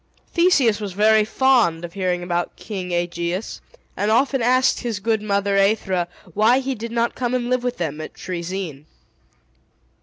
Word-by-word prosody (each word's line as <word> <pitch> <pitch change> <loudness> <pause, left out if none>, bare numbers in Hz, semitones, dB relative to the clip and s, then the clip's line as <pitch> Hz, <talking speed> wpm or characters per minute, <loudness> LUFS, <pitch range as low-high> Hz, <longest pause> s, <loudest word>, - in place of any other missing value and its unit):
Theseus 290 - +3
was 205 -3 -5
very 215 +2 +4
fond 220 -8 +2
of 170 - -10
hearing 180 -2 -1
about 175 0 -2
King 185 -4 -6
Aegeus, 175 +2 -2 0.3
and 205 - 0
often 265 +4 +2
asked 255 +2 +3
his 230 -4 -3
good 220 +1 0
mother 200 -1 +1
Aethra 195 -3 +1 0.3
why 220 +4 +4
he 270 0 -1
did 230 -1 -6
not 235 0 0
come 250 0 -2
and 245 0 -2
live 255 -1 +1
with 250 0 -2
them 155 -3 -3
at 155 - -8
Troezene. 170 -4 -5
210 Hz, 160 wpm, -21 LUFS, 180-240 Hz, 0.3 s, very